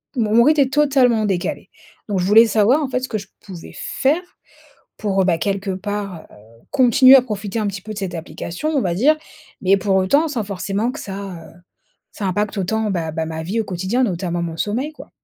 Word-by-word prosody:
mon 220 -4 0
mon 235 - +7
rythme 300 +2 +4
est 265 -1 +1
totalement 265 -7 +3
décalé. 190 -4 -2 0.4
Donc 200 -2 0
je 180 - 0
voulais 220 +4 +7
savoir, 220 +7 +3
en - - -1
fait, 255 - -1
ce 260 - -5
que 215 - -2
je 200 -1 -9 0.2
pouvais 185 -5 -10
faire 295 +6 0 0.8
pour, 195 -3 +1
heu, - - 0
bah, 175 -3 +2
quelque 200 +2 -2
part, 195 -2 -5
heu, - - -17 0.4
continuer 260 +1 +7
à 260 - +5
profiter 210 -3 -4
un 215 - 0
petit 195 -1 -5
peu 215 +1 -7
de - - -7
cette 190 -3 -4
application, 170 - -5
on 290 -4 +1
va 175 -4 -1
dire, 280 - +3 0.5
mais, 195 +1 +4
pour 190 0 +1
autant, 280 +13 +3
sans 240 -7 -3
forcément 200 +3 -2
que 300 - -8
ça, 195 -1 -6 0.3
heu, - - -17 0.6
ça 200 - -4
impacte 205 +3 -1
autant, 215 +3 -1
bah 170 -4 -2
bah, 160 +1 -2
ma 160 0 -5
vie 205 +7 -1
au - - -2
quotidien, 190 +6 -1
notamment 175 -4 -2
mon 165 -1 -4
sommeil, 250 - -2
quoi. - - -13
205 Hz, 220 wpm, -20 LUFS, 185-245 Hz, 0.8 s, mon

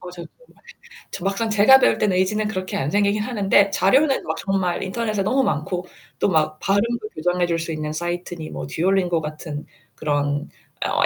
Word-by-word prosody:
맞아요, 180 -1 -9
정말. - - -24 0.5
저 195 - -6
막상 200 +3 0
제가 215 +5 +6
배울 - - +3
때는 190 -3 +1
의지는 210 +3 +1
그렇게 185 -3 -3
안 135 +2 -2
생기긴 205 +1 +2
하는데 200 -4 +3
자료는 265 - +3
막 - - -2
정말 195 -3 -1
인터넷에 215 +1 -2
너무 260 +7 +2
많고 180 - -2 0.3
또 - - +2
막 155 -3 +1
발음도 215 +3 0
교정해줄 175 +1 0
수 165 0 -4
있는 155 -1 -3
사이트니 175 0 -4
뭐 - - -6
듀얼링고 175 -1 +1
같은 150 -1 -6 0.3
그런 145 -1 -1 0.4
어 - - +2
185 Hz, 365 characters per minute, -22 LUFS, 165-210 Hz, 0.5 s, 제가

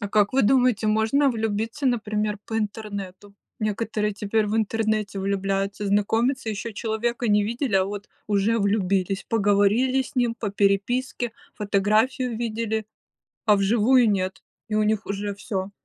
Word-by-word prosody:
А 205 - -3
как 205 0 +2
вы 270 - +3
думаете, 245 -2 +3
можно 220 +7 +3
влюбиться, 225 +3 -2
например, 215 -4 0
по 225 - -3
интернету? 205 -2 -5 0.2
Некоторые 215 -1 -1
теперь 210 +1 0
в 210 - -1
интернете 215 -2 0
влюбляются, 195 +1 -1
знакомятся, 225 +5 +1
ещё 215 +2 -4
человека 230 +2 -2
не 205 0 +3
видели, 235 +1 -2
а 190 -1 +4
вот 205 +1 -6 0.2
уже 210 +2 +2
влюбились, 195 -1 0
поговорили 215 +5 +3
с 265 +2 -7
ним 240 -2 +2
по 225 -3 -4
переписке, 215 +5 0 0.2
фотографию 215 +4 +1
видели, 220 -2 -2 0.6
а 210 -2 +6
вживую 230 +5 +4
нет! 190 -2 -1 0.2
И 215 - -2
у 215 - +3
них 215 0 0
уже 200 +1 -3
всё. 200 -1 -4
215 Hz, 145 wpm, -24 LUFS, 200-230 Hz, 0.6 s, а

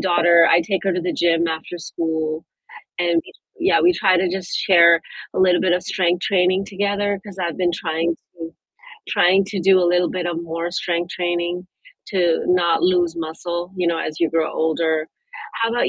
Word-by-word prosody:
daughter, 170 -2 +4
I 170 - +5
take 190 +3 -2
her 195 - +1
to 180 - -2
the 175 0 -2
gym 170 -1 +1
after 160 +2 -5
school, 160 -1 -3 0.6
and, 175 -1 +1
w 165 - +3 0.4
yeah, - - +3
we 360 - +4
try 190 - +2
to 185 - +1
just 185 0 -4
share 170 -2 +5 0.3
a - - -1
little 180 -1 +4
bit 185 -2 +1
of 180 0 -1
strength 180 -2 0
training 185 0 +1
together 200 0 -2
'cause 200 -3 -11
I've 170 -3 -3
been 180 -2 +1
trying 165 0 -2
to 165 -1 -12 0.6
trying 190 +3 +3
to 200 0 -4
do 190 +1 +5
a - - +2
little 180 0 +2
bit 180 -1 -3
of 170 -1 -3
more 165 +1 -4
strength 175 0 -2
training 175 0 -2 0.4
to 175 -4 +1
not 175 -2 +2
lose 175 -2 +2
muscle, 175 +2 -5
you 180 -1 -1
know, 170 -1 0
as 155 - -5
you 165 -2 +1
grow 165 -1 0
older. 160 0 -1 0.5
How 230 - +1
about 240 +1 +1
175 Hz, 195 wpm, -20 LUFS, 165-185 Hz, 0.6 s, I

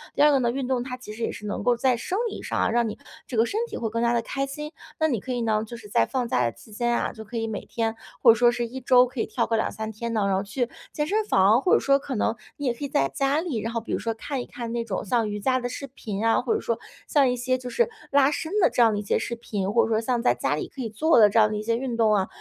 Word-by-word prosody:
第 - - +1
二 300 - +7
个 275 - +4
呢， 240 -2 +1
运 260 0 -3
动 255 -2 0
它 250 0 -6
其 245 -4 -9
实 225 - -10
也 - - 0
是 210 - -9
能 205 - -3
够 245 -1 +3
在 255 +1 +2
生 365 - -3
理 - - -7
上 - - -3
啊， - - +2
让 235 -1 +2
你 - - -7 0.3
这 240 - -4
个 225 - +5
身 420 - -2
体 - - -6
会 225 - -2
更 230 +1 -1
加 235 0 +2
地 235 - +2
开 275 +3 -2
心。 300 +2 -6 0.3
那 315 - +3
你 245 -8 0
可 255 +6 -6
以 245 - -1
呢， 215 -1 +1
就 235 +2 -8
是 220 -2 -12
在 115 - +2
放 250 -2 -1
假 125 - +1
的 115 - 0
期 215 - -17
间 240 +3 -1
啊， - - -1
就 220 -1 -9
可 230 +2 -7
以 225 - -1
每 215 -3 -5
天， 225 -1 -1 0.3
或 230 - +9
者 - - +3
说 240 +1 +4
是 240 0 -2
一 255 +3 -7
周 250 0 +6
可 255 0 -8
以 - - 0
跳 235 - 0
个 225 - 0
2-3 220 0 -2
天 230 +2 -5
的， 215 -3 +1
然 195 -1 +2
后 190 - +1
去 235 +5 -2 0.2
健 295 - -1
身 430 +5 +1
房， 210 - +4
或 365 - +2
者 - - +4
说 275 0 +3
可 270 -1 -5
能 220 - 0 0.2
你 285 - -4
也 245 - +2
可 240 - -9
以 - - -2
在 140 - +2
家 275 +2 +1
里， 320 -10 -2
然 230 +2 -4
后 230 - -1
比 - - -8
如 - - 0
说 230 - -2
看 265 +4 -4
一 - - -6
看 235 -2 -6
那 235 0 -1
种 200 -4 -3
像 225 +1 +1
瑜 210 - -4
伽 255 +5 +1
的 245 - -3
视 275 - -6
频 220 -5 -5
啊， 225 - +3
或 245 - 0
者 - - -2
说 230 - -2 0.3
像 275 -4 +4
一 250 - 0
些 255 +1 0
就 250 -1 -7
是 475 - +1 0.2
拉 280 0 +5
伸 315 +2 -4
的 - - +5
这 245 - +1
样 225 -2 +5
的 - - -1
一 - - -2
些 200 - +1
视 235 - -3
频， 205 -4 -3
或 230 +2 +4
者 - - -2
说 220 - +3
像 240 +1 0
在 120 - +3
家 130 +4 0
里 - - -4
可 270 - -8
以 230 - -3
做 275 +8 +3
的 210 -2 +7
这 215 - -1
样 215 -1 +5
的 215 - -2
一 210 - -3
些 230 +1 +1
运 245 -2 -3
动 220 -2 +4
啊， 190 -2 +1
235 Hz, 355 characters per minute, -25 LUFS, 220-260 Hz, 0.3 s, 或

